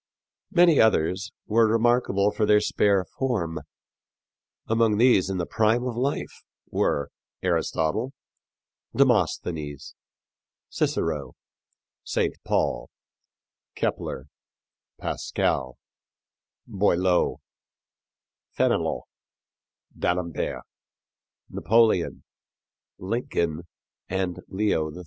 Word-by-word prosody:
Many 175 Hz, -4 st, +5 dB
others 100 Hz, -1 st, +2 dB
were 110 Hz, 0 st, +3 dB
remarkable 115 Hz, -3 st, +2 dB
for 105 Hz, 0 st, 0 dB
their 105 Hz, 0 st, +6 dB
spare 100 Hz, -2 st, +2 dB
form. 90 Hz, -12 st, -2 dB, 1.1 s
Among 115 Hz, -2 st, +2 dB
these 115 Hz, -6 st, +4 dB
in 95 Hz, -, -2 dB
the 85 Hz, -, -1 dB
prime 110 Hz, +4 st, +2 dB
of 125 Hz, -2 st, -3 dB
life 130 Hz, +4 st, -2 dB, 0.3 s
were 70 Hz, -, 0 dB, 0.3 s
Aristotle, 95 Hz, +11 st, 0 dB, 0.8 s
Demosthenes, 75 Hz, -5 st, 0 dB, 0.8 s
Cicero, -, -, -1 dB, 0.7 s
St. -, -, 0 dB
Paul, -, -, 0 dB, 0.9 s
Kepler, 65 Hz, -, -3 dB, 0.7 s
Pascal, 65 Hz, -2 st, -2 dB, 0.9 s
Boileau, 95 Hz, -2 st, +1 dB, 1.2 s
Fénelon, -, -, +1 dB, 0.9 s
D'Alembert, 90 Hz, -2 st, -2 dB, 0.8 s
Napoleon, 110 Hz, -5 st, +2 dB, 0.7 s
Lincoln 85 Hz, -6 st, -2 dB, 0.4 s
and 95 Hz, -1 st, -2 dB
Leo 95 Hz, -6 st, 0 dB
XIII. 90 Hz, -, -10 dB
100 Hz, 75 wpm, -25 LUFS, 85-115 Hz, 1.2 s, their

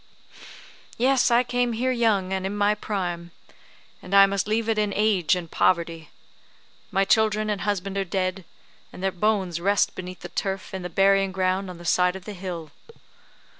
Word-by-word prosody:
Yes, 260 Hz, +2 st, +3 dB
I 240 Hz, +1 st, +4 dB
came 245 Hz, -1 st, 0 dB
here 250 Hz, +3 st, 0 dB
young, 215 Hz, -6 st, +1 dB
and 190 Hz, -1 st, -2 dB
in 195 Hz, +2 st, -3 dB
my 205 Hz, 0 st, +3 dB
prime; 175 Hz, -5 st, -4 dB, 0.7 s
and 195 Hz, -, -3 dB
I 195 Hz, 0 st, +9 dB
must 195 Hz, 0 st, -1 dB
leave 220 Hz, +1 st, 0 dB
it 225 Hz, -1 st, +1 dB
in 210 Hz, -1 st, 0 dB
age 205 Hz, -5 st, +2 dB
and 175 Hz, -2 st, -6 dB
poverty. 165 Hz, -2 st, 0 dB, 0.8 s
My 195 Hz, +1 st, +1 dB
children 215 Hz, 0 st, +2 dB
and 205 Hz, -, -3 dB
husband 195 Hz, -1 st, -2 dB
are -, -, +1 dB
dead, 185 Hz, 0 st, -2 dB, 0.5 s
and 180 Hz, -, -10 dB
their 195 Hz, -, +1 dB
bones 185 Hz, -3 st, 0 dB
rest 200 Hz, +2 st, +2 dB
beneath 185 Hz, 0 st, -8 dB
the -, -, -8 dB
turf 195 Hz, -1 st, -4 dB
in 190 Hz, -, -4 dB
the 180 Hz, -, -5 dB
burying 195 Hz, +1 st, +3 dB
ground 185 Hz, 0 st, -1 dB
on 180 Hz, -, -8 dB
the 175 Hz, -, -12 dB
side 180 Hz, +2 st, +2 dB
of 190 Hz, 0 st, -9 dB
the 210 Hz, -, -6 dB
hill. 175 Hz, -5 st, -6 dB
195 Hz, 180 wpm, -24 LUFS, 180-210 Hz, 0.8 s, I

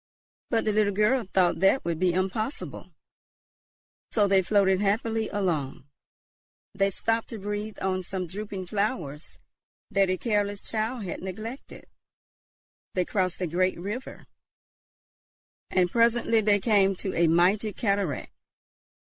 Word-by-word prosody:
But 225 Hz, -2 st, +1 dB
the 215 Hz, -, +2 dB
little 205 Hz, -1 st, +2 dB
girl 230 Hz, +5 st, +3 dB
thought 180 Hz, -2 st, +3 dB
that 195 Hz, +8 st, +3 dB
would 170 Hz, -2 st, -1 dB
be 185 Hz, -1 st, +3 dB
impossible. 185 Hz, -, -3 dB, 1.2 s
So 210 Hz, -3 st, +3 dB
they 195 Hz, -1 st, +4 dB
floated 190 Hz, 0 st, +3 dB
happily 220 Hz, +2 st, 0 dB
along. 155 Hz, -9 st, -2 dB, 0.9 s
They 195 Hz, 0 st, +2 dB
stopped 225 Hz, +3 st, -1 dB
to 225 Hz, -, -7 dB
breathe 210 Hz, +1 st, -4 dB
on 185 Hz, -1 st, 0 dB
some 185 Hz, 0 st, -4 dB
drooping 195 Hz, +1 st, -6 dB
flowers 180 Hz, -, -3 dB, 0.5 s
that 195 Hz, -1 st, +3 dB
a 185 Hz, -, +1 dB
careless 205 Hz, -2 st, -1 dB
child 225 Hz, +1 st, -2 dB
had 180 Hz, -, -5 dB
neglected. 215 Hz, +8 st, -7 dB, 1.1 s
They 180 Hz, -1 st, +1 dB
crossed 185 Hz, -2 st, -1 dB
a -, -, +1 dB
great 180 Hz, +2 st, 0 dB
river, 210 Hz, +8 st, -6 dB, 1.4 s
and 180 Hz, -2 st, +2 dB
presently 230 Hz, -1 st, +3 dB
they 205 Hz, -1 st, +3 dB
came 195 Hz, -2 st, +3 dB
to 190 Hz, +1 st, -4 dB
a 170 Hz, 0 st, +3 dB
mighty 185 Hz, +6 st, +3 dB
cataract. 200 Hz, -, -1 dB
200 Hz, 130 wpm, -27 LUFS, 185-215 Hz, 1.4 s, they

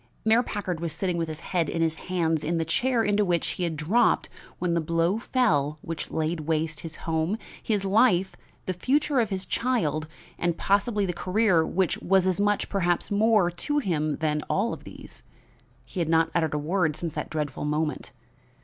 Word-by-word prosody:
Mayor 220 Hz, +2 st, +5 dB
Packard 200 Hz, -7 st, -3 dB
was 165 Hz, -2 st, -3 dB
sitting 180 Hz, +1 st, -1 dB
with 165 Hz, -1 st, -1 dB
his 155 Hz, 0 st, -7 dB
head 170 Hz, -4 st, -1 dB
in 165 Hz, -, 0 dB
his 160 Hz, -1 st, 0 dB
hands 165 Hz, -4 st, +1 dB
in 170 Hz, +2 st, 0 dB
the 165 Hz, -, 0 dB
chair 240 Hz, +8 st, +1 dB
into 205 Hz, 0 st, +2 dB
which 175 Hz, -3 st, 0 dB
he 180 Hz, -, -2 dB
had 165 Hz, -2 st, -3 dB
dropped 180 Hz, +11 st, +2 dB, 0.3 s
when 180 Hz, -1 st, 0 dB
the 170 Hz, -, +1 dB
blow 165 Hz, +5 st, +1 dB
fell 155 Hz, -, +1 dB
which 165 Hz, -1 st, -5 dB
laid 160 Hz, +1 st, -1 dB
waste 155 Hz, 0 st, -1 dB
his 160 Hz, 0 st, -7 dB
home, 165 Hz, +5 st, 0 dB, 0.2 s
his 205 Hz, -3 st, 0 dB
life, 195 Hz, -2 st, +3 dB, 0.3 s
the 185 Hz, -, -1 dB
future 275 Hz, -, +1 dB
of 225 Hz, -3 st, +1 dB
his 190 Hz, -1 st, -3 dB
child 160 Hz, -, 0 dB, 0.3 s
and 170 Hz, -1 st, 0 dB
possibly 205 Hz, +1 st, +1 dB
the 180 Hz, -, -2 dB
career 185 Hz, -1 st, +2 dB
which 180 Hz, +1 st, 0 dB
was 190 Hz, 0 st, +3 dB
as 185 Hz, -1 st, +1 dB
much, 205 Hz, 0 st, +1 dB
perhaps 175 Hz, -3 st, 0 dB
more, 210 Hz, -3 st, +3 dB
to 290 Hz, -, -2 dB
him 155 Hz, -, 0 dB
than 150 Hz, -2 st, -1 dB
all 220 Hz, +5 st, +1 dB
these. -, -, -12 dB, 0.6 s
He 185 Hz, -, -6 dB
had 165 Hz, -2 st, 0 dB
not 165 Hz, 0 st, +3 dB
uttered 160 Hz, -3 st, +1 dB
a -, -, +1 dB
word 155 Hz, +1 st, 0 dB
since 165 Hz, -2 st, -4 dB
that 150 Hz, -2 st, -4 dB
dreadful 150 Hz, -2 st, -3 dB
moment. 150 Hz, +1 st, -2 dB
175 Hz, 190 wpm, -26 LUFS, 160-205 Hz, 0.6 s, Mayor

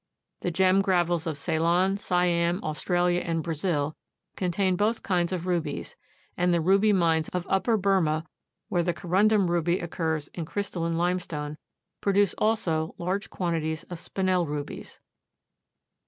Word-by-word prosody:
The -, -, -2 dB
gem 185 Hz, +2 st, +3 dB
gravels 175 Hz, -3 st, +1 dB
of 155 Hz, -3 st, -2 dB
Ceylon, 170 Hz, +6 st, +2 dB
Siam, 175 Hz, -2 st, +1 dB
Australia 175 Hz, +4 st, +1 dB
and 165 Hz, -2 st, -2 dB
Brazil 155 Hz, -2 st, -1 dB, 0.4 s
contain 185 Hz, +1 st, +1 dB
both 215 Hz, +5 st, 0 dB
kinds 175 Hz, -2 st, +1 dB
of 180 Hz, -2 st, -3 dB
rubies, 170 Hz, -5 st, -2 dB, 0.4 s
and 180 Hz, 0 st, +2 dB
the 170 Hz, -, +3 dB
ruby 195 Hz, +5 st, +4 dB
mines 165 Hz, -5 st, +2 dB
of 180 Hz, -1 st, -3 dB
Upper 220 Hz, +4 st, +2 dB
Burmah, 180 Hz, -6 st, +1 dB, 0.4 s
where 175 Hz, -, +1 dB
the 175 Hz, 0 st, -1 dB
corundum 200 Hz, +3 st, +3 dB
ruby 175 Hz, +1 st, +1 dB
occurs 160 Hz, -3 st, -2 dB
in 175 Hz, -, -7 dB
a -, -, -3 dB
crystalline 170 Hz, -5 st, -2 dB
limestone, 170 Hz, -4 st, -2 dB, 0.4 s
produce 200 Hz, -1 st, +3 dB
also 175 Hz, -8 st, 0 dB
large 185 Hz, +4 st, -2 dB
quantities 160 Hz, -3 st, -2 dB
of 175 Hz, -, -5 dB
Spinel 185 Hz, -2 st, 0 dB
rubies. 145 Hz, 0 st, -6 dB
175 Hz, 140 wpm, -27 LUFS, 165-190 Hz, 0.4 s, ruby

